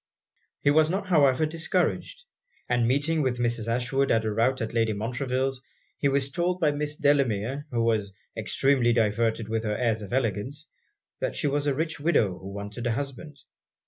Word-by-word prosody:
He 145 - +4
was 155 +1 +4
not 195 +3 -1
however 150 -5 +4
discouraged; 165 - -1 0.4
and 120 -1 +2
meeting 145 +5 +1
with 130 -3 0
Mrs. 120 -2 -1
Ashwood 125 +4 0
at 115 -1 +2
a 110 - -1
rout 120 +4 +2
at 110 -2 -3
Lady 115 -2 +2
Montreville's, 125 +4 -2 0.4
he 140 - +2
was 140 0 0
told 175 +5 0
by 155 -4 +3
Miss 150 0 -2
Delamere, 140 -1 +1
who 115 -3 0
was 110 -3 +1 0.2
extremely 130 -4 +2
diverted 115 0 +1
with 110 0 -1
her 105 -1 -1
airs 115 -3 0
of 100 - -8
elegance, 130 - -1 0.5
that - - -2
she - - -2
was 145 0 0
a 140 - +1
rich 160 +1 -2
widow 130 - +2
who 95 - -8
wanted 100 +4 -5
a 120 - +1
husband. 140 +3 -5
130 Hz, 175 wpm, -26 LUFS, 115-145 Hz, 0.5 s, He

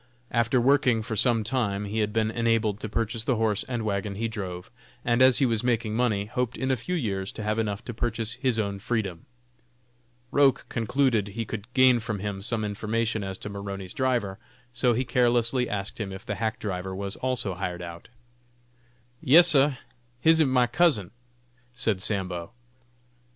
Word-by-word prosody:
After 115 +2 +2
working 125 -3 +3
for 110 0 -4
some 115 0 +2
time 105 -4 -1
he 105 +2 -3
had 105 -1 0
been 110 0 0
enabled 115 -3 +1
to 110 - -5
purchase 110 +1 -1
the 130 - +1
horse 110 -2 0
and 120 -3 -3
wagon 100 -1 -2
he 115 +3 -1
drove, 95 -5 -6 0.3
and 120 +1 +2
as 130 -2 +6
he 135 - +3
was 115 -2 0
making 115 -3 0
money, 110 -4 +1
hoped 125 +3 -2
in 130 0 -1
a - - +3
few 155 +10 -4
years 100 - -2
to 110 - -6
have 110 +1 0
enough 105 -1 -2
to 120 - -5
purchase 115 -1 -2
his 130 -2 0
own 100 -2 -2
freedom. 100 -6 -3 1.0
Roch 140 -2 +3
concluded 115 -2 +1
he 110 +3 -4
could 110 +2 -7
gain 130 -2 +6
from 110 -2 -3
him 100 0 -4
some 110 +1 -2
information 110 +1 -1
as 95 -1 -5
to - - -7
Maroney's 100 -2 -6
driver, 120 -7 -1 0.3
so 120 0 +2
he 125 +3 -1
carelessly 120 0 +2
asked 100 +1 -4
him 100 -3 -3
if 95 0 -9
the 105 - -3
hack 110 -1 -1
driver 95 -2 -4
was 100 0 -4
also 125 -6 0
hired 90 -1 -4
out. 85 0 -9 1.1
"Yes, 165 +4 +7
sah, 140 -2 +5 0.5
him 160 +5 +4
ib 155 - +4
my 130 -1 +3
cousin," 120 - +2 0.6
said 110 -6 0
Sambo. 95 -2 -2
110 Hz, 180 wpm, -26 LUFS, 100-125 Hz, 1.1 s, Yes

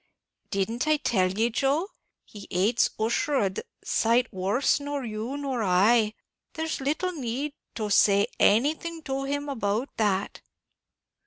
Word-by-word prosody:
"Didn't 225 +7 -1
I 310 0 +4
tell 190 -9 +1
ye, 225 +5 0
Joe, 280 - 0 0.4
he 205 -2 -11
hates 205 +6 +2
Ussher 235 +6 0
a 210 -7 +2
d 190 - -5
d - - -23 0.2
sight 235 +2 +1
worse 195 +11 +1
nor 285 -2 -4
you 215 +1 -4 0.2
or 260 -4 -1
I; 210 +3 +3 0.4
there's 320 -2 -3
little 310 +7 -1
need 280 -1 -3 0.2
to 215 -2 -3
say 200 0 +5
anything 310 +8 +2
to 270 0 -3
him 285 +1 -2
about 225 -1 -2
that." 205 -3 0
235 Hz, 145 wpm, -26 LUFS, 210-285 Hz, 0.4 s, say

